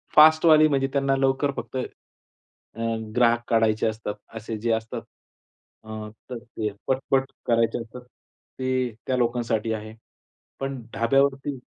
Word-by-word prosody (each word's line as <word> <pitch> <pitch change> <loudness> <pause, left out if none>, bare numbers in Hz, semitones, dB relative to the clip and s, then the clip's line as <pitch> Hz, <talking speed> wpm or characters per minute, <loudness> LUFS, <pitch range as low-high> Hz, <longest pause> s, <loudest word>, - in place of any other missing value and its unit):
फास्टवाली 155 0 +7
म्हणजे 135 -2 +1
त्यांना 135 -1 +2
लवकर 135 +1 +2
फक्त, - - -6
अ, 120 -2 -11 0.3
ग्राहक 120 -1 +4
काढायचे 110 -1 +3
असतात 110 -1 -3 0.2
असे 110 0 -5
जे 115 +2 -1
असतात, 110 0 -3 0.8
अ, 110 -1 -7 0.2
तर 125 - -4
ते 110 -3 -4 0.2
पटपट 135 0 +1 0.2
करायचे 115 0 +2
असतात, 115 +2 -10 0.6
ते 130 -1 0 0.2
त्या 130 -1 +1
लोकांसाठी 115 -2 0
आहे. 110 0 -6 0.7
पण 135 -1 -3
ढाब्यावरती 135 +3 +1
125 Hz, 125 wpm, -25 LUFS, 115-135 Hz, 0.8 s, फास्टवाली